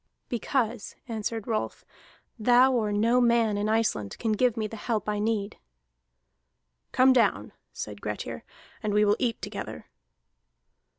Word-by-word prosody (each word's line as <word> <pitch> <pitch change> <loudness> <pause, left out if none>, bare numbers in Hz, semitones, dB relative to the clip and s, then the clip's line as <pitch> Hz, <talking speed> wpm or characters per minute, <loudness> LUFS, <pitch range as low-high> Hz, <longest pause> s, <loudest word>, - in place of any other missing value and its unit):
"Because," 240 -2 -2
answered 225 -1 -3
Rolf, 220 -2 -3 0.5
"thou, 245 +4 +5
or 220 -4 +1
no 230 +4 +3
man 235 -3 +3
in 205 +1 -1
Iceland, 215 - 0
canst 215 -2 -1
give 250 -2 +2
me 220 - -1
the 215 - -6
help 220 -1 -2
I 210 -1 -1
need." 210 -1 -1 1.3
"Come 260 +1 +5
down," 245 -3 +1 0.2
said - - -7
Grettir, - - -5 0.4
"and 210 -2 -1
we 210 0 +5
will 205 0 +4
eat 235 -3 0
together." - - -6
225 Hz, 135 wpm, -27 LUFS, 210-240 Hz, 1.3 s, thou